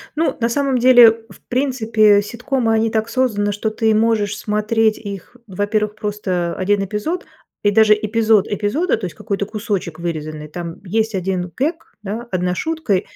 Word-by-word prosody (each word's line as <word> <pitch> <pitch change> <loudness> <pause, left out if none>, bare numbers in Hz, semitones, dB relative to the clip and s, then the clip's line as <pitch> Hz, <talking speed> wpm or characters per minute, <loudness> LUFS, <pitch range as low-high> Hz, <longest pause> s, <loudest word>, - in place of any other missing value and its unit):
Ну, 325 +2 0
на 230 -1 +1
самом 270 +1 0
деле, 245 -2 +8 0.2
в - - -16
принципе, 225 -6 +3
ситкомы, 235 +2 -1
они 225 0 +2
так 220 0 -1
созданы, 220 -6 0
что 205 +2 -2
ты 220 0 +1
можешь 215 -2 +1
смотреть 215 +1 +1
их, 200 +2 -8
во-первых, 210 +2 -1
просто 185 -5 -2
1 200 +1 +1
эпизод 215 - -3 0.4
и 205 - +3
даже 215 +1 +6
эпизод 215 -1 +2
эпизода, 220 - 0
то 220 - -5
есть 175 - -7
какой-то 205 -2 -3
кусочек 200 -6 -4
вырезанный, 155 -3 -5
там 165 +2 -7
есть 220 +4 0
1 180 -1 -2
гэг, 325 +4 -3
да, 220 +4 -5
1 180 0 -1
шутка, 315 - -1
215 Hz, 160 wpm, -19 LUFS, 200-230 Hz, 0.4 s, деле